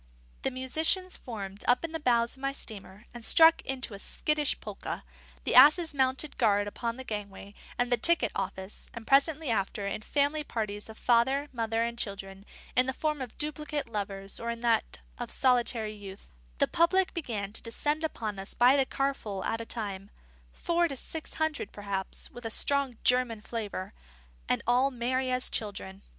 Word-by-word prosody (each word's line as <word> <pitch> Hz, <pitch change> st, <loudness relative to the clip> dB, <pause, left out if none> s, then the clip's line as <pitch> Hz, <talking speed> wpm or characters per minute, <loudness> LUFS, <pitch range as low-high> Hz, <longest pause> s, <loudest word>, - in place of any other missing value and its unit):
The -, -, 0 dB
musicians 315 Hz, +8 st, 0 dB
formed 200 Hz, -4 st, -7 dB
up 245 Hz, +6 st, +3 dB
in 330 Hz, -, -6 dB
the 325 Hz, -, -3 dB
bows 235 Hz, -4 st, +2 dB
of 265 Hz, -, -18 dB
my 275 Hz, 0 st, -1 dB
steamer, 205 Hz, -4 st, -7 dB
and 240 Hz, -1 st, -9 dB
struck 325 Hz, +7 st, +8 dB
into 255 Hz, -4 st, -3 dB
a 200 Hz, -, -8 dB
skittish 300 Hz, +6 st, 0 dB
polka; 210 Hz, -2 st, -6 dB, 0.4 s
the -, -, -1 dB
asses 305 Hz, +5 st, +7 dB
mounted 265 Hz, +2 st, 0 dB
guard 205 Hz, -3 st, +3 dB
upon 230 Hz, +3 st, -4 dB
the 260 Hz, -, -6 dB
gangway 205 Hz, -3 st, -6 dB, 0.2 s
and 245 Hz, 0 st, 0 dB
the 245 Hz, -, +4 dB
ticket 335 Hz, +9 st, +3 dB
office; 190 Hz, 0 st, -5 dB
and 230 Hz, -1 st, -8 dB
presently 280 Hz, +1 st, +3 dB
after, 200 Hz, -1 st, -1 dB
in 200 Hz, -, -3 dB
family 290 Hz, +5 st, 0 dB
parties 215 Hz, -5 st, -4 dB
of 220 Hz, -, -10 dB
father, 265 Hz, +5 st, +2 dB
mother, 225 Hz, -1 st, 0 dB
and 235 Hz, 0 st, -3 dB
children, 195 Hz, -2 st, -4 dB, 0.3 s
in 255 Hz, +1 st, +4 dB
the 260 Hz, -, -1 dB
form 305 Hz, -2 st, -1 dB
of 250 Hz, -3 st, -7 dB
duplicate 300 Hz, -2 st, -3 dB
lovers 195 Hz, -2 st, -3 dB
or 235 Hz, -, -4 dB
in 235 Hz, 0 st, -4 dB
that 230 Hz, -2 st, +1 dB, 0.2 s
of -, -, -4 dB
solitary 240 Hz, -4 st, +2 dB
youth, 200 Hz, -2 st, -11 dB, 0.3 s
the -, -, +3 dB
public 370 Hz, +3 st, +2 dB
began 215 Hz, -, -4 dB
to -, -, +1 dB
descend 295 Hz, +7 st, -2 dB
upon 215 Hz, -10 st, -3 dB
us 195 Hz, -, -5 dB
by 250 Hz, +3 st, +6 dB
the 270 Hz, -2 st, +2 dB
carful 245 Hz, -8 st, -2 dB
at 225 Hz, 0 st, -2 dB
a 230 Hz, -, -8 dB
time; 200 Hz, -3 st, -2 dB, 0.4 s
four 340 Hz, -, +1 dB
to 275 Hz, -, -5 dB
six 315 Hz, +4 st, -6 dB
hundred 315 Hz, -9 st, -1 dB
perhaps, 200 Hz, -2 st, -3 dB
with 245 Hz, -, -11 dB
a 225 Hz, -, -3 dB
strong 275 Hz, +1 st, +1 dB
German 250 Hz, -3 st, +3 dB
flavour, 210 Hz, -4 st, -5 dB, 0.6 s
and -, -, +1 dB
all 250 Hz, +3 st, +3 dB
merry 255 Hz, +1 st, -1 dB
as 255 Hz, 0 st, +2 dB
children. 95 Hz, -, -3 dB
240 Hz, 180 wpm, -29 LUFS, 210-275 Hz, 0.6 s, struck